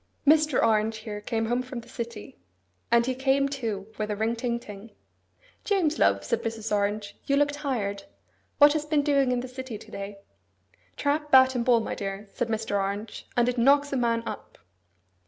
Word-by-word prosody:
Mr. 305 -2 +4
Orange 220 0 +2
here 215 -1 -7
came 225 +1 -1
home 240 +2 0
from 255 -1 -7
the 230 - -18
city; 235 +2 -7 0.5
and 235 0 +4
he 260 - 0
came, 270 +2 +2
too, 230 -8 -4
with 215 0 -2
a 210 - -1
ring 220 +3 0
ting 235 0 -2
ting. 210 -1 -11 0.7
'James 350 -7 +1
love,' - - +3
said 470 - 0
Mrs. 225 -1 -2
Orange, 205 0 -2
'you 280 - +3
look 290 0 +3
tired. 235 -9 -3 0.5
What 290 0 +7
has 310 -1 -1
been 300 -1 +1
doing 280 -3 +2
in 245 -1 0
the 255 - -6
city 255 -3 -7
to - - -15
day?' 200 0 -6 0.8
'Trap, 295 +1 0
bat, 260 -1 +7
and 245 -2 0
ball, 235 -1 +4
my - - -4
dear,' 195 +1 -5
said 240 - -1
Mr. 220 -2 -1
Orange, 200 +2 -4
'and 240 0 +4
it 250 0 0
knocks 280 +3 +4
a - - +1
man 230 -2 +1
up. - - -7
235 Hz, 190 wpm, -27 LUFS, 215-275 Hz, 0.8 s, What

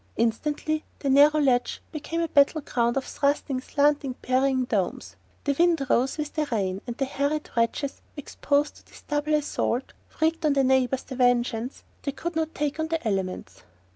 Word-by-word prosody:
Instantly 295 +7 0
the 275 - -1
narrow 295 +3 +6
ledge 255 -4 +2
became 325 +2 -3
a 335 - 0
battle 295 +1 +4
ground 240 -2 0
of 270 - -1
thrusting, 280 -2 0
slanting, 285 -2 +1
parrying 260 0 +1
domes. 200 -7 -2 0.3
The 280 -1 0
wind 335 -5 +3
rose 260 +4 +2
with 300 -1 -4
the 305 -1 -1
rain, 195 -3 -1
and 240 0 -5
the 270 - 0
harried 285 +3 -2
wretches 235 +4 -1 0.2
exposed 290 +1 -1
to - - -19
this - - -16
double 295 +1 0
assault 275 -4 -1 0.3
wreaked 325 +1 +1
on 300 -2 +3
their 275 -1 +3
neighbours 260 0 +2
the 265 - -8
vengeance 245 -1 +1 0.2
they 280 - -3
could 340 +4 -5
not 320 0 -1
take 295 +1 -2
on 315 - 0
the 320 -6 -2
elements. 185 - -3
280 Hz, 175 wpm, -26 LUFS, 245-300 Hz, 0.3 s, narrow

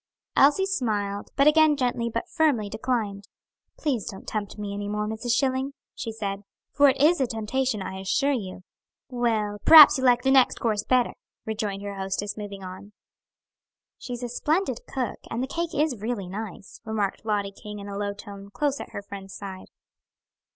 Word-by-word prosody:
Elsie 295 +8 +5
smiled, 210 - -2
but 275 - +4
again 305 0 +5
gently 245 -3 0
but 230 0 -3
firmly 290 -11 +1
declined. 215 -3 -2 0.5
"Please 265 - -1
don't 195 - -10
tempt 210 -1 -4
me 205 -1 -4
any 205 0 -4
more, 210 0 -1
Mrs. 220 +2 -1
Schilling," 265 +1 0 0.2
she 230 - -5
said; 200 -3 -4 0.3
"for 285 0 +5
it 270 - 0
is 305 +2 +4
a 260 - +2
temptation, 225 0 -1
I 190 0 -6
assure 275 +9 +1
you." 190 -8 -4 0.5
"Well, 225 -5 0
p'raps 305 -3 +10
you'll 260 - +2
like 245 0 +4
the 265 - +3
next 265 -2 +4
course 215 -3 0
better," 250 0 +2 0.3
rejoined 210 -2 -3
her 200 0 -4
hostess, 195 +1 -3
moving 205 -2 -7
on. 185 +3 -9 1.1
"She's 245 -1 -6
a 245 - -3
splendid 295 +1 0
cook 255 -3 -3
and 235 +3 -2
the - - -2
cake 335 +3 -3
is 285 -7 0
really 215 -4 -3
nice," 200 0 -8
remarked 210 -3 -2
Lottie 205 -2 -1
King 210 +1 -9
in 200 0 -8
a 200 - -6
low 200 0 -2
tone, 200 -1 -10
close 285 +6 -1
at - - -9
her 200 - -5
friend's 195 -1 -9
side. 190 -2 -8
220 Hz, 180 wpm, -26 LUFS, 200-260 Hz, 1.1 s, p'raps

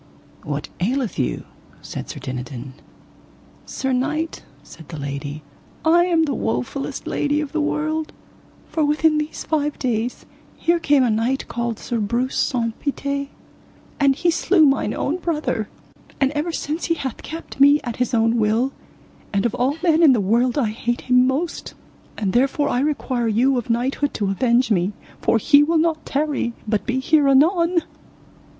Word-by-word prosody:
What 145 0 -4
aileth 235 - -1
you? 130 - -1 0.4
said - - -7
Sir - - -6
Dinadan. 130 0 -6 0.9
Sir 265 -1 -2
knight, 300 +6 -1 0.2
said 160 +1 -14
the 160 - -6
lady, 140 +1 -5 0.4
I 340 +2 +5
am 335 -3 +3
the 290 -3 0
wofullest 125 - -3
lady 290 0 0
of 300 -2 -3
the 315 - -1
world, 310 +1 -1 0.6
for 315 - -1
within 305 +1 +3
these 300 +1 -4
five 295 -2 -1
days 240 -1 -2 0.3
here 340 +1 +2
came 290 -4 +3
a 240 - +2
knight 235 +5 0
called 235 -2 -3
Sir 235 - -3
Breuse 235 +5 -1
Saunce 230 -3 0
Pité, 280 0 -2 0.7
and 275 -2 +4
he 345 +4 +2
slew 330 0 +4
mine 275 -1 +1
own 310 +5 -1
brother, 305 - -2 0.5
and 270 -1 +2
ever 300 +3 -2
since 315 +1 -3
he 335 - +1
hath 265 -6 -5
kept 325 -3 -8
me 285 +2 +7
at 240 -3 -5
his 250 -1 0
own 230 +1 +2
will, 225 +5 +2 0.6
and 200 +1 0
of 235 - 0
all 270 +5 0
men 330 -2 +4
in 305 -5 +7
the 235 - +2
world 235 +6 +2
I 245 -7 +2
hate 240 +2 -2
him 250 0 +4
most; 295 +6 -3 0.4
and 200 -4 -1
therefore 275 +4 +2
I 245 - +1
require 265 -4 -1
you 245 +5 +3
of 240 - -8
knighthood 260 +5 0
to 200 -2 0
avenge 240 +3 +2
me, 185 0 +1 0.3
for - - +3
he 285 +6 +5
will 325 +3 +2
not 320 -1 0
tarry, 280 -4 -1
but 215 0 -1
be 255 +1 0
here 295 +1 +3
anon. 335 +5 +4
265 Hz, 170 wpm, -21 LUFS, 230-300 Hz, 0.9 s, me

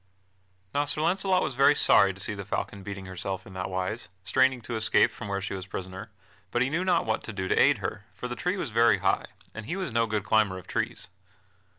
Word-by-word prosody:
Now 145 +1 +1
Sir 145 +1 -3
Launcelot 185 +2 +2
was - - -2
very 140 +3 +5
sorry 100 -8 +6
to 95 - -13
see 105 - 0
the 100 -1 -6
falcon 100 +1 -4
beating 100 -1 -7
herself 95 +1 -4
in 95 - -12
that 95 0 -4
wise, 95 +3 -3
straining 130 +5 +3
to 115 +1 -5
escape 110 0 +4
from 105 - -8
where 100 0 -2
she 95 - -4
was 95 -1 -6
prisoner, 95 +3 -7 0.4
but 120 +5 +1
he 130 - -2
knew 170 +4 0
not 180 -2 +2
what 110 -1 0
to - - -5
do 95 -3 -4
to - - +2
aid - - +5
her, - - -5
for 125 - -6
the 125 - -5
tree 180 +8 -1
was 150 -10 -4
very 115 -1 +4
high, 95 0 0 0.3
and 110 -1 -8
he 170 - -2
was 185 -7 -3
no 115 0 +2
good 105 -2 -1
climber 100 -1 +2
of 90 - -10
trees. - - -3
110 Hz, 240 wpm, -27 LUFS, 95-130 Hz, 0.4 s, sorry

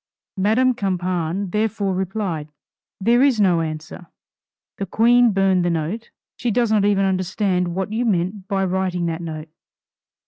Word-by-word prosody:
Madame 225 +7 +3
Campan 185 -3 -2
therefore 210 -2 0
replied, 185 -5 -3 0.5
"There 235 +5 +3
is 270 -5 +3
no 180 -5 +3
answer, 155 +2 -6 0.7
the 195 - -3
Queen 240 +4 +4
burned 190 -2 +2
the 175 - +1
note. 170 +8 -3 0.3
She 245 - -1
does 235 0 +1
not 210 -2 +3
even 200 -1 +2
understand 185 -1 0
what 190 +2 -3
you 230 +2 0
meant 190 -2 -1
by 195 -1 0
writing 185 -1 -1
that 165 0 -3
note." 155 -1 -6
190 Hz, 145 wpm, -21 LUFS, 175-215 Hz, 0.7 s, Queen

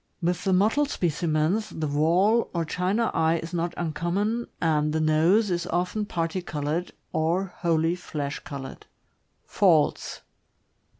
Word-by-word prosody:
With 180 0 -1
the 190 - +2
mot 195 +4 +4
tled 290 +1 +1
specimens, 170 - 0
the 160 - -4
wall 170 +10 +2
or 170 -1 0
china 190 +8 0
eye 160 +1 +2
is 165 +1 -7
not 170 0 -2
uncommon, 180 +8 -1
and 150 -2 +1
the 160 - +1
nose 165 +7 +3
is 175 0 -1
often 180 +5 -1
parti 170 0 -2
colored 155 +1 -3 0.2
or 175 +3 0
wholly 165 -1 +1
flesh 150 -5 -4
colored. 135 -2 -8 0.6
Faults. 170 -7 +2
170 Hz, 135 wpm, -26 LUFS, 160-190 Hz, 0.6 s, mot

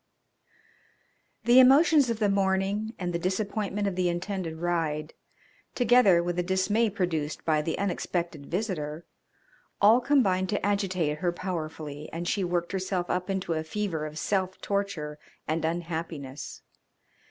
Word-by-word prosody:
The 240 +3 +7
emotions 275 +1 +6
of 230 - 0
the 215 -1 +2
morning 195 +3 0
and 175 -2 -3
the 170 - -1
disappointment 200 +2 -1
of 195 - -2
the 180 -1 +1
intended 175 -1 -3
ride, 160 -3 -1 0.6
together 240 -8 +5
with 175 0 -2
the - - +2
dismay 190 +5 +1
produced 175 -7 -2
by 155 -2 +2
the 160 +1 -2
unexpected 175 -6 -2
visitor, 165 -5 -3 0.7
all 220 +5 +6
combined 195 -9 +2
to 205 - -1
agitate 185 -7 0
her 175 -2 +1
powerfully, 155 -4 -5
and 170 +1 -4
she 195 +1 0
worked 175 -1 -1
herself 185 -2 -2
up 180 +1 -2
into 190 -3 -1
a 160 0 -2
fever 160 -3 -3
of 155 0 -9
self 190 +2 -1
torture 200 -7 -3 0.3
and 160 +1 -1
unhappiness. 160 -4 -4
185 Hz, 140 wpm, -28 LUFS, 165-200 Hz, 0.7 s, The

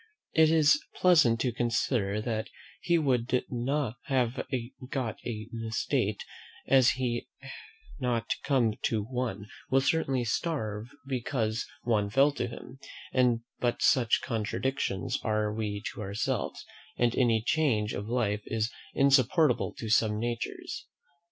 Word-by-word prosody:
It 160 -1 +5
is 160 - +4
pleasant 150 -11 +5
to 125 - +1
consider, 115 -3 0
that 110 -2 -2 0.3
he 170 - +2
who 165 - +2
would 125 -2 +1 0.6
have 130 -2 0 0.4
got 130 -6 -3
an 110 -2 -5
estate, 110 -1 -1 0.4
had 135 -2 +5
he 125 -2 +1 0.7
not 120 -2 -1
come 125 -6 +2
to 110 -3 0
one, 115 -4 -3 0.2
will 135 - +4
certainly 135 -3 +1
starve 115 -5 -2 0.2
because 120 -3 -2 0.2
one 105 -4 +1
fell 135 +6 +4
to 140 - -3
him; 130 +2 -10 0.8
but 120 -1 0
such 125 -6 +4
contradictions 115 -3 -2
are 105 -1 0
we 105 -2 -3
to - - -8
ourselves, 100 +1 -2 0.3
and 120 -1 +2
any 115 -3 +3
change 125 -10 +1
of 100 - -4
life 110 -4 0
is 110 0 -1 0.2
insupportable 140 +1 +4
to 115 - -5
some 110 -1 +3
natures. 120 0 -4
120 Hz, 125 wpm, -29 LUFS, 110-135 Hz, 0.8 s, It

